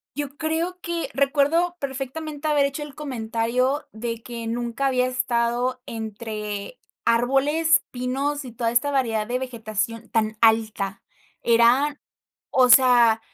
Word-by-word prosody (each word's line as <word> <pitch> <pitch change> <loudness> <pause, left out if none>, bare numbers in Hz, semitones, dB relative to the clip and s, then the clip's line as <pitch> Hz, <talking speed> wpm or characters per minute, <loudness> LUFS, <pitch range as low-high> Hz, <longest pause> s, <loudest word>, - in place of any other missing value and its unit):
Yo 290 -1 -4
creo 330 +3 -2
que 340 -1 -3
recuerdo 290 +6 +2
perfectamente, 285 +3 -5
haber 290 -2 +3
hecho 280 +2 -5
el 295 -2 -8
comentario, 250 0 -1
de 230 +1 -5
que 235 -1 -7
nunca 240 +3 -2
había 255 -1 +2
estado 250 0 0
entre 215 - -6 0.3
árboles, 275 +7 +3
pinos, 270 +3 -2
y 245 - -9
toda 230 0 -1
esta 240 +4 +2
variedad 230 -6 0
de 245 +2 -1
vegetación, 230 -2 -4
tan 220 -1 0
alta. 220 -3 +2 0.4
Eran 245 +6 +3 0.5
o 255 -1 +4
sea 240 -3 +6
250 Hz, 125 wpm, -24 LUFS, 230-285 Hz, 0.5 s, sea